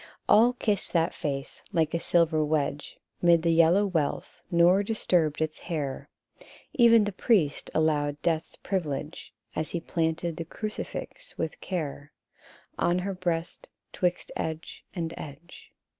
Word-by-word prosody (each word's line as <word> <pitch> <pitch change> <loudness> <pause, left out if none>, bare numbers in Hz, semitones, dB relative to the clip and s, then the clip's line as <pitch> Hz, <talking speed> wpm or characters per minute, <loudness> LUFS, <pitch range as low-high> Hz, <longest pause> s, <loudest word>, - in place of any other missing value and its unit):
GOLD 165 - -16
HAIR. - - -7
77 215 - +8
All 245 +1 +3 0.2
kissed - - -6
that 165 -1 +2
face, 140 -2 -4
like 160 -4 +1
a 170 - +1
silver 165 -2 +2
wedge 150 -1 -1 0.2
'Mid 170 -2 +5
the 170 - +3
yellow 170 +5 +5
wealth, 165 -7 -2
nor 175 +3 +5
disturbed 180 -8 +1
its 155 0 -4
hair: 145 -5 -4 0.7
E'en 230 -2 +7
the 205 - -1
priest 185 - +1
allowed 145 -2 +1
death's 165 -2 0
privilege, 155 -5 -4 0.2
As 155 - -2
he 170 - -2
planted 165 0 -1
the 165 - -4
crucifix 215 +6 -6
with 160 -1 -4
care 145 -5 -4 0.7
On 175 +1 +2
her 195 +2 -2
breast, 175 -2 -3 0.2
'twixt 180 -1 -1
edge 160 0 -5
and 165 -2 -3
edge. 155 +4 -11
165 Hz, 145 wpm, -28 LUFS, 155-180 Hz, 0.7 s, 77